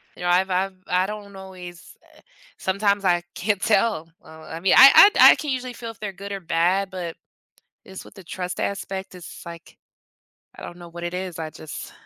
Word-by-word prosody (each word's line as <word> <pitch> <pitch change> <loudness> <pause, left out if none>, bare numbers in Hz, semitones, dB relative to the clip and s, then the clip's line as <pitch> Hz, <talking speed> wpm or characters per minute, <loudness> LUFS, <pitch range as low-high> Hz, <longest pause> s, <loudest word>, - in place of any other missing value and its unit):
you - - -10
know, 175 - 0
I've 185 +2 +2
I've 190 +1 -1
I 180 +1 +1
don't 205 -1 -8
always 180 -2 -11 0.2
eh, - - -20 0.4
sometimes 200 +1 0
I 175 -1 +2
can't 205 0 -1
tell, 205 -6 +1
uh, 160 0 -14
I 165 - -8
mean, 185 +2 +2
I 275 +9 +9
I - - +10
I - - +4
can 300 -2 -4
usually 255 -1 -4
feel 230 -1 -7
if 225 - -20
they're 210 -2 -5
good 200 +2 -9
or 195 - -4
bad, 175 +3 0
but 180 -3 -6 0.7
it's 190 0 -10
with - - -16
the 190 -3 -13
trust 180 +1 -5
aspect, 195 -1 -4
it's 180 -2 -11
like 170 0 -12 0.8
I - - -11
don't 175 - -9
know 175 -1 -11
what 170 +1 -9
it 175 +1 -4
is. 180 -2 -5
I 160 -1 -5
just 155 0 -9
185 Hz, 210 wpm, -23 LUFS, 175-200 Hz, 0.8 s, I